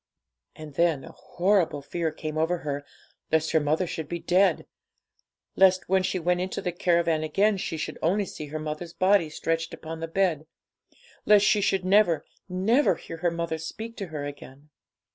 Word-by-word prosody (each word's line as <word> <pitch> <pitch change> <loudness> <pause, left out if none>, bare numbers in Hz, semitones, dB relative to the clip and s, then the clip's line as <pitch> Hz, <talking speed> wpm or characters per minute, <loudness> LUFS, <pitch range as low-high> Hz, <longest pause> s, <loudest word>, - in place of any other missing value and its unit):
And 155 -2 -10
then 165 -3 +1
a - - -10
horrible 180 -6 0
fear 165 +3 -2
came 155 0 -6
over 165 +3 +1
her 145 -1 -3 0.5
lest 160 0 +2
her 160 - +4
mother 155 +4 +1
should 160 -3 -5
be 175 - -2
dead 180 +3 +2 0.9
lest 185 -1 +4
when 190 +1 +3
she 185 - -1
went 180 +1 0
into 185 +1 -3
the 180 - -2
caravan 170 -2 +1
again 195 +7 +2
she 165 -3 -3
should 155 - -5
only 195 +5 +1
see 155 -4 -8
her 155 +2 -5
mother's 155 +2 -5
body 185 -1 +3
stretched 165 +2 -2
upon 160 0 -8
the 165 - -4
bed 165 -3 0 0.8
lest 210 -1 +6
she 210 - +4
should 190 -1 +1
never, 190 -4 +3 0.2
never 215 +10 +2
hear 165 - -9
her 175 +1 +1
mother 170 -1 -3
speak 220 +8 -7
to 195 - -4
her 150 -3 -5
again. 145 0 -10
170 Hz, 180 wpm, -26 LUFS, 155-185 Hz, 0.9 s, lest